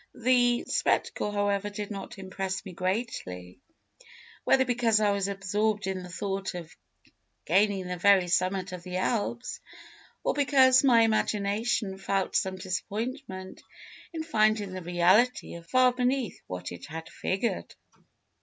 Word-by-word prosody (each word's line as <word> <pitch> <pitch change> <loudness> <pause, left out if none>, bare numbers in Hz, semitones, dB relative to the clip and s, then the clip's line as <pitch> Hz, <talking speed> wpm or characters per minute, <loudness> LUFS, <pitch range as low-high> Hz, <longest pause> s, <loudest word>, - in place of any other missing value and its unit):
The 245 0 +3
spectacle, 210 - 0
however, 205 0 0
did 205 0 -6
not 195 0 -7
impress 190 0 -4
me 190 - -8
greatly, 180 - -4 0.8
whether 260 0 +4
because 235 -3 +2
I 210 -1 +3
was 200 -1 0
absorbed 205 +1 -1
in 190 -1 -3
the 180 - -9
thought 195 0 -3
of 170 -3 -8 0.7
gaining 195 +2 +2
the 180 0 -4
very 195 -1 +5
summit 185 +1 0
of 180 -1 -6
the 180 0 -5
Alps, 235 +5 -2 0.6
or - - +1
because 265 -2 +5
my 240 -4 +6
imagination 215 -1 0
felt 195 0 -1
some 190 -2 +1
disappointment 195 +2 -5 0.5
in 325 -2 -4
finding 215 - +1
the 185 - -5
reality 175 +3 +2
far 250 +9 +3
beneath 250 -2 -1
what 90 -1 -6
it 90 0 -9
had 160 +2 -7
figured. 195 +5 -3
200 Hz, 135 wpm, -28 LUFS, 185-230 Hz, 0.8 s, my